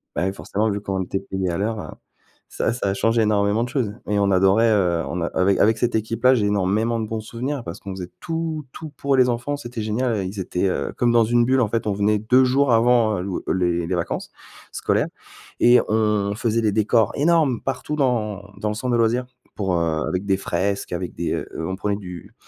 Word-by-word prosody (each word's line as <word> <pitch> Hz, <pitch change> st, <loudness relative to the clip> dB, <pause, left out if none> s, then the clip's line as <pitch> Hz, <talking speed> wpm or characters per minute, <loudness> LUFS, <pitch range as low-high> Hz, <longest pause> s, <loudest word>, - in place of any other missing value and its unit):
bah, 90 Hz, -, 0 dB
oui, 95 Hz, -, -1 dB
forcément, 105 Hz, +2 st, -2 dB
vu 100 Hz, 0 st, -3 dB
qu'on 95 Hz, -2 st, -2 dB
était 95 Hz, +2 st, -3 dB
payé 95 Hz, -2 st, -3 dB
à 85 Hz, -, -2 dB
l'heure, 110 Hz, +2 st, -1 dB
heu, -, -, -6 dB, 0.6 s
ça 115 Hz, -, -1 dB
ça 100 Hz, -5 st, -1 dB
change 115 Hz, +3 st, +1 dB
énormément 105 Hz, +1 st, +2 dB
de 120 Hz, -, -4 dB
choses 125 Hz, -7 st, -1 dB, 0.2 s
et 105 Hz, -, +1 dB
on 100 Hz, -1 st, +2 dB
adorait, 95 Hz, +5 st, +4 dB, 0.4 s
on 85 Hz, 0 st, -3 dB
a 85 Hz, -, 0 dB
avec 95 Hz, +1 st, +2 dB
avec 110 Hz, +2 st, +4 dB
cette 120 Hz, +1 st, 0 dB
équipe-là, 115 Hz, +4 st, +2 dB
j'ai 105 Hz, -3 st, +1 dB
énormément 105 Hz, +4 st, +1 dB
de 110 Hz, -, -3 dB
bons 110 Hz, 0 st, -3 dB
souvenirs 125 Hz, +4 st, -4 dB
parce 85 Hz, +3 st, -7 dB
qu'on 100 Hz, -, -8 dB
faisait 90 Hz, -2 st, -7 dB
tout, 160 Hz, -2 st, -3 dB
tout 160 Hz, -1 st, -8 dB
pour 140 Hz, -1 st, +1 dB
les 125 Hz, -1 st, +5 dB
enfants, 120 Hz, +5 st, -1 dB
c'était 120 Hz, -4 st, -6 dB
génial, 110 Hz, -2 st, -1 dB
ils 100 Hz, +1 st, -7 dB
étaient, 90 Hz, +1 st, -1 dB
heu, -, -, -2 dB
comme 120 Hz, -1 st, +2 dB
dans 115 Hz, -1 st, +5 dB
une 120 Hz, +1 st, +3 dB
bulle, 130 Hz, 0 st, +3 dB
en 110 Hz, -, +1 dB
fait, 115 Hz, -1 st, -1 dB
on 100 Hz, -, +1 dB
venait 105 Hz, +1 st, +2 dB
2 125 Hz, +5 st, +4 dB
jours 130 Hz, 0 st, +3 dB
avant 115 Hz, -4 st, +3 dB
l'ou 95 Hz, -1 st, -3 dB
les 85 Hz, -2 st, 0 dB
les 90 Hz, -, -1 dB
vacances 85 Hz, -, -3 dB, 0.4 s
scolaires -, -, 0 dB, 0.5 s
et 120 Hz, +1 st, +6 dB
on 105 Hz, -2 st, +1 dB
faisait 115 Hz, 0 st, 0 dB
des 105 Hz, -2 st, +2 dB
décors 110 Hz, +1 st, +2 dB
énormes 150 Hz, -4 st, +2 dB
partout 135 Hz, +3 st, -3 dB
dans 105 Hz, -7 st, -1 dB
dans 105 Hz, -, -2 dB
le -, -, -1 dB
centre 125 Hz, +2 st, -2 dB
de -, -, +3 dB
loisirs 120 Hz, +2 st, +1 dB, 0.3 s
pour, 95 Hz, -3 st, -1 dB
heu, 80 Hz, -2 st, 0 dB
avec 95 Hz, +2 st, -2 dB
des 95 Hz, -1 st, +2 dB
fresques, 100 Hz, +1 st, -2 dB
avec 90 Hz, 0 st, -4 dB
des 85 Hz, -, -2 dB
on 90 Hz, +4 st, -3 dB
prenait 100 Hz, +1 st, -2 dB
du 90 Hz, -4 st, -10 dB
110 Hz, 220 wpm, -22 LUFS, 95-120 Hz, 0.6 s, et